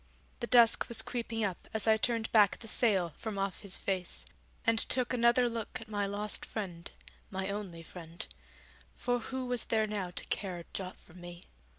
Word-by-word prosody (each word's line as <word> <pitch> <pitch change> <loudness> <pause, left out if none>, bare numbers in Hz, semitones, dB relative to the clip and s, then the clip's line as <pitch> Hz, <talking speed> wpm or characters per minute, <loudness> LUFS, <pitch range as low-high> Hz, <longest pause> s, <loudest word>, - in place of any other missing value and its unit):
The - - -3
dusk 235 -2 +6
was 235 - +3
creeping 230 -2 -3
up 190 -4 -3
as 220 0 +1
I 220 - +7
turned 225 0 0
back 210 -3 +5
the 225 - -10
sail 200 -7 +4
from 220 -3 -5
off 195 -1 -2
his 200 -3 -2
face 185 -3 -1 0.4
and 225 0 +4
took 255 +1 +2
another 240 0 +4
look 230 +1 -4
at 225 -2 -11
my 205 -2 0
lost 205 +1 0
friend, 180 -6 -5 0.4
my 190 0 -3
only 190 -5 -5
friend; 165 0 -8 0.7
for 245 0 0
who 260 +2 -4
was 245 -2 +3
there 220 -1 +2
now 205 -4 -3
to 175 - -6
care 190 -3 -2
a 170 - -10
jot 185 -1 -5
for 160 - -19
me? 175 0 -10
210 Hz, 190 wpm, -32 LUFS, 185-230 Hz, 0.7 s, I